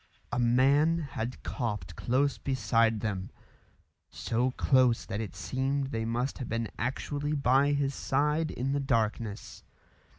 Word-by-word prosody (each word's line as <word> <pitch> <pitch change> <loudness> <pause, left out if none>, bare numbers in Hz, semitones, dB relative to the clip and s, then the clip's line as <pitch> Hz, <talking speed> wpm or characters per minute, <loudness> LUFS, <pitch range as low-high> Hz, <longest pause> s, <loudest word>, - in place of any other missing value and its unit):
A - - -1
man 135 +7 +4
had 125 -6 -5
coughed 105 - -3
close 130 -1 +1
beside 115 -3 +1
them 95 -4 -3 0.8
so 120 +3 -1
close 130 -2 +3
that 105 - -3
it 110 - -6
seemed 135 +1 -1
they 115 -3 -2
must 120 +4 -2
have 125 - -5
been 115 -1 -2
actually 145 +4 -2
by 140 0 +3
his 140 -1 0
side 150 +4 0
in 130 +2 -2
the 140 - +1
darkness. 115 -5 -2
130 Hz, 135 wpm, -29 LUFS, 115-140 Hz, 0.8 s, man